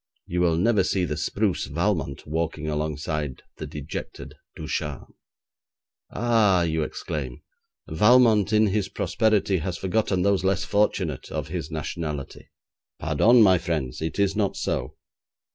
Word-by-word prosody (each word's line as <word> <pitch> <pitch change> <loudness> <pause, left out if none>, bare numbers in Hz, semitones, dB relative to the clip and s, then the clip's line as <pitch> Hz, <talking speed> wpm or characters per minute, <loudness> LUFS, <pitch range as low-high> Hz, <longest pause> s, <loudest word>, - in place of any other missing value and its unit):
You 90 +1 -2
will 85 -2 +3
never 100 +3 +3
see 95 0 0
the 75 - -3
spruce - - -1
Valmont 70 0 -2
walking 80 0 -3
alongside 75 -2 -3
the - - -6
dejected 75 -2 -7 0.2
Ducharme. 75 -3 -5 1.0
'Ah!' 110 -6 +3
you 80 -1 0
exclaim, 75 - -5 0.4
'Valmont 110 +3 +4
in 110 0 +4
his 100 -1 0
prosperity 105 -3 +1
has 90 +2 -3
forgotten 95 -1 0
those 100 -1 +2
less 95 0 +1
fortunate 100 -8 0
of - - -4
his - - -4
nationality.' 75 -2 -5 0.5
Pardon, 120 +1 +4
my 95 -3 +5
friends, 75 -8 -3
it 80 0 -3
is 100 0 +1
not 105 -2 0
so. - - -3
90 Hz, 130 wpm, -25 LUFS, 80-105 Hz, 1.0 s, my